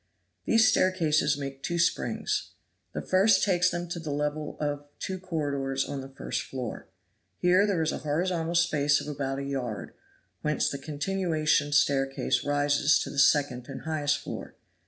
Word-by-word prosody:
These 225 -1 +5
staircases 160 -7 +2
make 135 -1 -6
two 170 - -2
springs; 170 0 0 0.4
the - - -5
first 190 +1 +4
takes 180 -2 +3
them 175 0 -3
to 175 - -4
the 160 -2 -6
level 150 +1 -2
of 145 -1 -3
two 190 0 -4
corridors 140 -6 -2
on 140 -1 -4
the 135 - -9
first 135 - -4
floor. 125 -4 -6 0.5
Here 180 +3 +4
there 180 -5 +1
is 160 - 0
a - - -4
horizontal 165 +2 -1
space 150 -4 +3
of - - -7
about 135 -2 -3
a 140 - -3
yard, 130 -6 -4 0.5
whence 150 -1 +1
the 140 - -4
continuation 155 -1 0
staircase 135 -1 +2
rises 145 +1 +3
to - - -6
the 140 - -2
second 135 -4 +3
and 135 - -6
highest 150 -2 0
floor. - - -7
150 Hz, 160 wpm, -28 LUFS, 140-175 Hz, 0.5 s, These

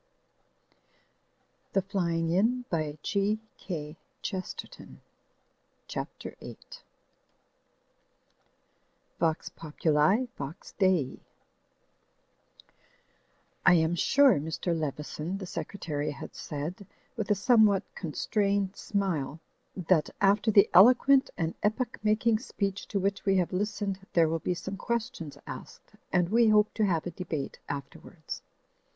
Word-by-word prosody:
Digitized 190 +5 +1
by 155 -3 -1
CjOOQ 205 +1 +1 0.3
IC 170 +4 -6 0.9
CHAPTER - - -6
VIII - - -9 2.6
vox 160 -1 0
POPULI 160 +8 +1
VOX 140 +3 -7
DEI 185 -9 +2 2.4
"I 185 - +7
AM 160 0 +3
sure," 270 - +5
Mr. 160 +3 -2
Leveson, 155 +3 -3
the 195 - -6
Secretary, 155 -5 -4
had 145 - -7
said, 160 +7 -6 0.3
with 220 -3 -3
a 210 - +4
somewhat 215 -2 +4
constrained 195 +3 -1
smile, 165 -8 -2 0.4
"that 175 -3 +2
after 205 +2 +3
the 205 -1 +6
eloquent 255 +7 +7
and 165 -1 -1
epoch 220 +4 -1
making 215 +1 +2
speech 200 -5 -3
to 200 - -1
which 195 +1 -1
we 195 -1 +3
have 180 0 0
listened 200 0 -2
there 165 -2 +5
will 165 +1 -1
be 180 +3 -1
some 195 +3 -6
questions 215 -9 -3
asked, - - -10 0.2
and 175 -1 +2
we 230 +2 +4
hope 210 -1 +4
to 215 - +1
have 165 -4 0
a 175 - -3
debate 160 -5 -5
afterwards. 140 -1 -7
190 Hz, 105 wpm, -29 LUFS, 160-210 Hz, 2.6 s, I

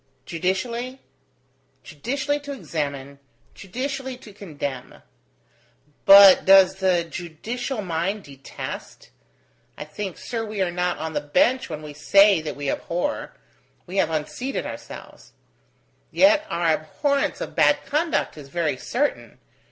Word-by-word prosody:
Judicially? 235 +9 -2 0.8
Judicially 280 - -2
to 285 0 -8
examine, 140 - -5 0.3
judicially 260 +5 -5
to 215 -5 -14
condemn: 145 -9 -7 1.0
but 195 -1 +9
does 195 -1 +6
the 185 -3 +2
judicial 210 - -5
mind 185 +4 -2
detest? 135 -1 -9 0.7
I - - -5
think, 180 +5 -6
sir, 230 -2 -4
we 215 -2 -6
are 185 -2 +1
not 180 0 -1
on 160 +1 -5
the 145 - -1
bench 240 - +1
when 155 -1 -6
we 150 -1 -8
say 195 +4 +5
that 155 -1 -5
we 145 0 -5
abhor: 175 - -3 0.5
we 185 +2 -6
have 190 - +3
unseated 160 - -3
ourselves. - - -10 0.8
Yet 305 +1 +4
our 170 -1 +1
abhorrence 280 - -1
of - - -6
bad - - +3
conduct 305 - -1
is 140 -2 -12
very 155 -3 -1
certain. 280 - -2
190 Hz, 125 wpm, -23 LUFS, 155-245 Hz, 1.0 s, but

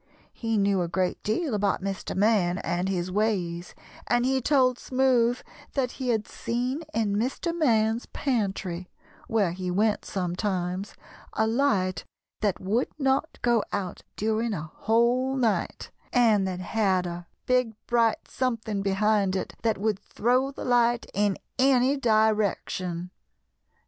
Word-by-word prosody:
He 225 -2 -1
knew 200 -2 +2
a 175 - -1
great 185 +1 -1
deal 255 +6 -1
about 200 -2 0
Mr. 195 -1 -4
Man 190 -3 +3
and 180 0 -1
his 185 -1 -2
ways, 180 -5 -1 0.3
and 240 0 +2
he 265 0 +1
told 255 -2 +3
Smoothe 255 -2 +2 0.3
that 255 -3 0
he 260 -2 -4
had 220 -3 0
seen 250 +5 -2
in 215 -5 0
Mr. 275 +9 -1
Man's 230 -7 +2
pantry, 195 -8 -2 0.4
where 205 -6 +2
he 180 +1 -4
went 210 +4 +1
sometimes, 185 0 -2 0.4
a 220 - +2
light 205 -8 +1 0.4
that 205 -3 0
would 215 +7 0
not 275 +2 0
go 240 -3 +3
out 190 -3 -3
during 220 +1 0
a 155 -2 -6
whole 240 +4 +2
night, 235 -5 -1 0.2
and 220 -6 +4
that 180 -1 -3
had 190 -2 +1
a 175 0 -6 0.2
big 250 -3 +1
bright 230 -2 +1
something 230 -5 -2
behind 200 0 +2
it 190 - -3
that 225 -1 +1
would 210 -1 0
throw 250 +6 +1
the 275 - -7
light 240 -1 +3
in 205 -1 +1 0.2
any 265 0 +4
direction. 210 -7 0
220 Hz, 140 wpm, -26 LUFS, 190-245 Hz, 0.4 s, and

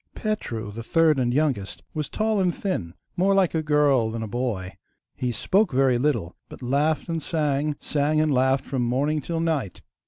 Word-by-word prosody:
Petru, 120 - -3
the 115 +3 -7
third 155 +4 +3
and 120 -1 +1
youngest, 130 -8 -1
was 155 -2 -3
tall 215 -1 0
and 180 -2 +1
thin, 90 - -3 0.2
more 195 +2 +3
like 190 -3 +3
a 160 - +1
girl 145 -6 +3
than 115 0 -4
a - - -4
boy. 105 -5 -3 0.4
He 125 -1 -2
spoke 190 - +1
very 130 -2 +3
little, 125 - 0
but - - -11
laughed 145 +5 +1
and 165 -1 -2
sang, 150 -2 0
sang 150 +1 0
and 155 -2 +2
laughed, 130 +1 +2
from 135 -2 -2
morning 140 +6 0
till 165 +4 -3
night. 155 - -2
145 Hz, 185 wpm, -24 LUFS, 120-160 Hz, 0.4 s, third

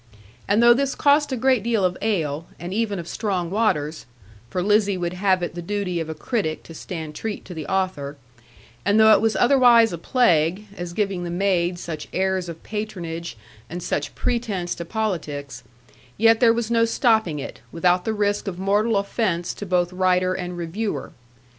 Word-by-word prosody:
And 210 +4 +3
though 240 0 +8
this 275 +2 -1
cost 290 0 +3
a 260 - -1
great 255 -1 +3
deal 220 -3 +1
of 180 0 0
ale, 165 -7 -1
and 175 +2 -5
even 215 -2 -1
of 170 -2 -6
strong 185 -6 -2
waters 160 - 0 0.4
(for 180 +8 -2
Lizzie 205 -1 +2
would 175 -1 -2
have 185 -1 +1
it 175 - -3
the 175 - -6
duty 185 -1 -2
of 160 -1 -4
a 160 - -4
critic 175 -10 -2
to 165 - -12
stand 160 -2 -6
treat 215 +6 -5
to 185 - -8
the 160 -3 -6
author), 185 -7 -2 0.7
and 205 +2 +3
though 220 0 +7
it - - +4
was 225 0 +1
otherwise 240 -4 +5
a 170 - -5
plague, 180 -4 +2
as 175 -2 -6
giving 195 -2 -1
the 175 - -4
maid 175 -1 +1
such 160 -3 -6
airs 190 -1 0
of 165 -1 -9
patronage, 170 - -5 0.3
and 175 +1 -6
such 145 - -2
pretence 210 -8 -2
to 170 - -6
politics; 155 - -3 0.6
yet 225 +1 +5
there 235 -2 +6
was 235 0 -1
no 230 -1 +4
stopping 220 - +2
it, 140 - -7
without 180 +2 +2
the 220 - -1
risk 205 -1 0
of 185 -3 -4
mortal 205 +3 +1
offence 200 -4 -1
to 205 - -7
both 180 0 +1
writer 185 0 +2
and 180 -1 -5
reviewer. 175 -2 -3
190 Hz, 185 wpm, -23 LUFS, 170-220 Hz, 0.7 s, though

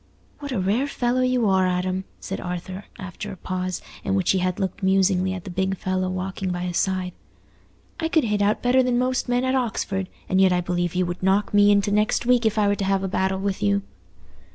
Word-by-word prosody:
"What 285 -1 -6
a 245 - -1
rare 210 +9 +1
fellow 250 -2 0
you 255 -3 +2
are, 190 -1 +3
Adam!" 185 +1 -1
said 195 - -5
Arthur, 180 +2 -5
after 190 +2 -7
a 190 - -8
pause, 185 0 -4 0.2
in 195 - 0
which 190 -3 +2
he 190 - +2
had 185 +1 -1
looked 190 0 -3
musingly 190 -1 +2
at 185 -2 -5
the 190 - -7
big 190 +1 -1
fellow 185 0 -1
walking 185 +1 -3
by 175 0 -3
his 180 -1 -2
side. 185 -2 -1 0.9
"I 325 - 0
could 320 -1 +2
hit 210 -2 0
out 205 +1 +1
better 250 +2 +4
than 250 -1 +1
most 255 0 0
men 245 +1 +1
at 260 - +1
Oxford, 215 -6 -1 0.2
and 190 +1 +2
yet 190 -1 +5
I 180 - +2
believe 175 0 -1
you 180 0 +2
would 175 +1 -5
knock 195 +3 +1
me 205 0 +6
into 205 0 +3
next 210 +3 +1
week 245 -2 +4
if 220 0 -1
I 210 -1 +3
were 200 - +2
to 195 - -2
have 195 0 +1
a - - 0
battle 190 +1 0
with 195 -1 -2
you." 100 -1 +2
190 Hz, 230 wpm, -24 LUFS, 185-215 Hz, 0.9 s, me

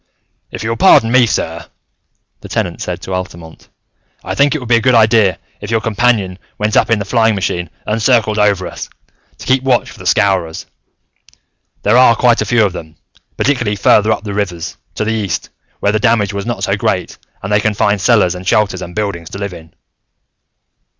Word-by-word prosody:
"If - - -7
you 110 - -2
will 115 - -3
pardon 115 0 +5
me, 125 -1 +5
sir," 85 -4 -3 0.7
the - - -12
Tenant - - -3
said - - -4
to 95 - -5
Altamont, 85 -3 -7 0.5
"I - - -4
think 140 +2 +2
it - - +1
would 125 -5 -8
be 120 0 +4
a - - 0
good 125 +1 +3
idea 110 -5 +4 0.2
if - - -7
your 115 -1 +1
companion 110 -4 0 0.2
went 105 0 -1
up - - +3
in 115 - +3
the 100 - -4
flying 110 +1 +2
machine 90 -3 -2 0.2
and 110 +1 -2
circled 110 -2 +2
over 100 -3 +2
us, - - -7 0.5
to - - -11
keep 130 0 +2
watch 130 -2 0
for - - -15
the - - -6
Scowrers. 90 -5 +1 1.2
There 105 +4 +3
are 125 -2 +6
quite 120 -1 +2
a - - -1
few 115 0 +3
of 95 - -2
them, 80 -2 -9 0.4
particularly 120 -7 0
farther 105 +2 +3
up - - -1
the 105 -2 -5
rivers, 90 -5 -3 0.2
to 110 - -2
the 110 - 0
east, 100 -6 -3 0.3
where 100 - +2
the 110 - 0
damage 110 -3 +1
was 100 +2 -4
not 120 - -3
so - - +1
great - - -2 0.2
and 95 +2 -2
they 105 - +4
can 105 0 0
find 105 -1 +1
cellars 100 -4 +3
and 90 +1 -9
shelters 100 -1 +1
and 90 - -8
buildings 100 -6 -3
to - - -8
live 100 -2 -5
in." 80 -2 -13
105 Hz, 205 wpm, -15 LUFS, 95-115 Hz, 1.2 s, are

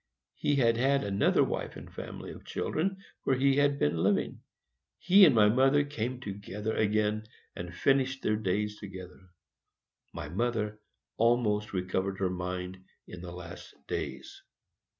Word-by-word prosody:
He 145 - 0
had 115 -4 +3
had 135 +3 +2
another 100 0 +3
wife - - -3
and - - -11
family - - -7
of - - -11
children 190 +4 -2 0.2
where 135 - +1
he 135 +1 +3
had 145 -1 +3
been 80 - +1
living. 95 +4 +1 0.6
He 190 +2 +7
and 145 -7 +5
my 105 -2 +6
mother 135 +6 +4
came 130 -3 -4
together 105 -1 -5
again, 110 0 +1 0.3
and 85 0 -6
finished 135 +6 +1
their 105 - +2
days 105 +1 -1
together. 95 -2 -10 0.8
My - - -6
mother 105 +3 -1 0.4
almost 110 -2 +2
recovered 95 +1 -2
her 95 -2 0
mind 90 +1 -5 0.2
in 90 - -9
her 90 - -7
last 85 -1 -10
days. - - -5
105 Hz, 145 wpm, -30 LUFS, 95-130 Hz, 0.8 s, He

